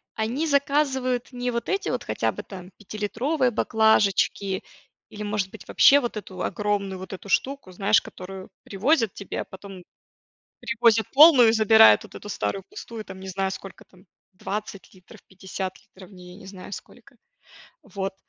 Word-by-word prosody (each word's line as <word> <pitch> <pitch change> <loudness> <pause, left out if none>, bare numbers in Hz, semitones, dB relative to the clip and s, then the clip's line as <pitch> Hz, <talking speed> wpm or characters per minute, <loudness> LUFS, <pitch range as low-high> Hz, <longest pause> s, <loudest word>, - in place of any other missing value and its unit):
они 240 +9 -2
заказывают 275 -4 0
не 245 0 -2
вот 235 0 -4
эти 390 +1 -1
вот, - - -2
хотя - - -1
бы - - -8
там, 185 -1 -11
пятилитровые 235 - -1
баклажечки 210 -3 +1 0.5
или, 210 - -8
может 205 -2 -2
быть, 220 - -13
вообще 285 +1 +6
вот 240 -4 -4
эту 190 -3 -8
огромную 200 -2 -2
вот 190 +1 -8
эту 195 +2 -9
штуку, 270 -4 -1
знаешь, 200 +3 +2
которую 185 +1 -10
привозят 225 +2 +1
тебе, 200 - -6
а - - -7
потом 190 -1 -11 0.8
привозят 230 -2 +2
полную 280 -5 +8
и - - +1
забирают 220 0 +6
вот 215 - -15
эту 205 - -9
старую 195 -1 -3
пустую. 225 -2 -9
Там 190 -1 -10
не 190 - -8
знаю 190 +1 -2
сколько 190 0 -9
там: 185 0 -22 0.3
20 200 +1 -6
литров, 185 -1 -17
50 190 0 -6
литров 185 0 -16
в - - -18
ней, 180 -1 -13
я - - -13
не 190 - -13
знаю 190 0 -11
сколько. - - -11 0.7
Вот. 195 -1 -5
205 Hz, 165 wpm, -24 LUFS, 190-235 Hz, 0.8 s, полную